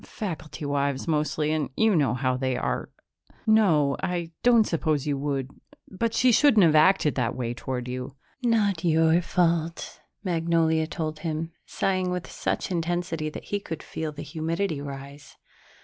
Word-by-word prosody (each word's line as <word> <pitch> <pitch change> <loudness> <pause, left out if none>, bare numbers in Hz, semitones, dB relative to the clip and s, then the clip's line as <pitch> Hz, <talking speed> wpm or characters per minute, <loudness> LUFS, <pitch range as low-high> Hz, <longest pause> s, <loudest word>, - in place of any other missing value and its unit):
Faculty 160 -7 -6
wives 140 0 -1
mostly 155 -1 0
and 155 -2 -1
you 220 -3 +4
know 140 -7 +2
how 130 0 0
they 130 -1 -1
are.... - - -2 0.6
No, 165 -11 +4
I 175 -2 -2
don't 235 -2 +5
suppose 155 -6 0
you 145 -1 0
would. 135 -2 -2 0.4
But 225 +4 -1
she 250 0 +4
shouldn't 225 -6 +6
have 160 - +4
acted 155 -1 +4
that 125 -2 -1
way 120 -2 -2
toward 125 0 -4
you." 125 +2 -5 0.3
"Not 210 -7 +1
your 165 0 +4
fault," 170 -1 -1 0.2
Magnolia 165 -3 +1
told 155 -2 -4
him, 160 0 -3 0.2
sighing 185 -1 0
with 180 -1 -4
such - - -2
intensity 170 -2 -1
that - - -8
he 205 - +2
could 165 -5 -7
feel 160 -1 -4
the 150 - -8
humidity 165 0 -2
rise. 140 0 -9
160 Hz, 155 wpm, -26 LUFS, 145-180 Hz, 0.6 s, shouldn't